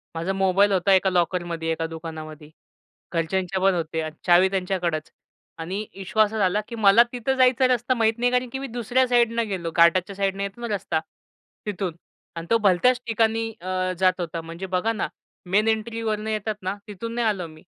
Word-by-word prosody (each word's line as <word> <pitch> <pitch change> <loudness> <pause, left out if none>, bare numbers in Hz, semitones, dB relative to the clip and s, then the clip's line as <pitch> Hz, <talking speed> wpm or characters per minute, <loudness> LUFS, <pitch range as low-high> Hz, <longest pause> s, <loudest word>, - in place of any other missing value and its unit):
माझा 170 +4 -2
मोबाईल 195 +1 +3
होता 195 +1 +3
एका 190 0 +4
लॉकरमध्ये 175 -2 -1
एका 165 0 -2
दुकानामध्ये. 155 -2 -8 0.6
घरच्यांच्या 185 +3 -1
पण 195 0 +4
होते 160 -1 -2
आणि 155 0 -6
चावी 180 +1 +5
त्यांच्याकडच. 180 -4 -2 0.5
आणि 190 +6 -4
इश्यू 195 +3 -1
असा 215 +1 -2
झाला 205 +1 +2
की 235 - -7
मला 220 +1 +6
तिथं 250 +2 -1
जायचा 255 0 +4
रस्ता 250 0 +1
माहीत 225 -2 +2
नाही, 245 +1 +1
कारण 250 0 0
की 265 - -4
मी 275 - -5
दुसऱ्या 245 +2 +1
साईडनं 235 -2 +2
गेलो. 175 -5 -3
घाटाच्या 180 +3 +4
साईडनं 195 0 -1
येतो 200 +4 -6
ना 235 - -3
रस्ता 165 -4 -2 0.7
तिथून 190 -5 -3 0.4
आणि 165 0 -6
तो 230 - +5
भलत्याच 225 +5 +3
ठिकाणी 225 0 +1
अ, 185 0 -1
जात 185 -1 +4
होता. 170 -1 -4
म्हणजे 165 +3 -7
बघा 225 +5 +1
ना 210 - -2 0.4
मेन 210 +3 +3
एंट्रीवरनं 220 -1 -1
येतात 215 0 -2
ना 190 +2 -2
तिथून 230 +3 -6
नाही 235 -2 +1
आलो 190 -5 -1
मी. 155 0 -15
195 Hz, 180 wpm, -24 LUFS, 175-225 Hz, 0.7 s, मला